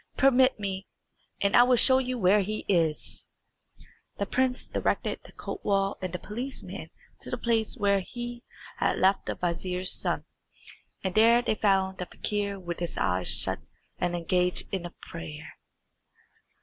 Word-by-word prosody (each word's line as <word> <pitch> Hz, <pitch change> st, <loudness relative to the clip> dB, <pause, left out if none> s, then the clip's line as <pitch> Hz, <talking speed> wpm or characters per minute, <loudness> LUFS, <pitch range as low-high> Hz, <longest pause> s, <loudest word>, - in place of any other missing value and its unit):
"Permit 260 Hz, -2 st, +4 dB
me, 195 Hz, -1 st, -4 dB, 0.5 s
and 200 Hz, 0 st, +2 dB
I -, -, +9 dB
will 250 Hz, +1 st, +5 dB
show 260 Hz, +2 st, +7 dB
you 255 Hz, -1 st, -2 dB
where 205 Hz, 0 st, +4 dB
he 215 Hz, +2 st, -4 dB
is." 165 Hz, -5 st, 0 dB, 0.9 s
The 200 Hz, -, -1 dB
prince 255 Hz, +3 st, 0 dB
directed -, -, -1 dB
the -, -, -15 dB
kotwal 195 Hz, -, -1 dB
and 185 Hz, -2 st, -3 dB
the 180 Hz, -, -3 dB
policeman 240 Hz, +9 st, -5 dB, 0.3 s
to -, -, -7 dB
the 250 Hz, -, -2 dB
place 230 Hz, 0 st, 0 dB
where 200 Hz, -2 st, +3 dB
he 240 Hz, +4 st, -7 dB, 0.4 s
had -, -, +1 dB
left 190 Hz, +1 st, +2 dB
the -, -, -2 dB
vizier's 180 Hz, +1 st, -1 dB
son, -, -, -1 dB, 0.8 s
and 190 Hz, -1 st, -1 dB
there 230 Hz, +3 st, +5 dB
they -, -, +1 dB
found 190 Hz, -3 st, +1 dB
the 180 Hz, -, -4 dB
fakir 200 Hz, -1 st, -2 dB
with 175 Hz, -2 st, -5 dB
his 175 Hz, -1 st, -3 dB
eyes 90 Hz, 0 st, 0 dB
shut -, -, +1 dB, 0.4 s
and 175 Hz, 0 st, 0 dB
engaged 180 Hz, +1 st, +1 dB
in 175 Hz, -3 st, -3 dB
prayer. 160 Hz, -2 st, -8 dB
200 Hz, 150 wpm, -28 LUFS, 180-235 Hz, 0.9 s, I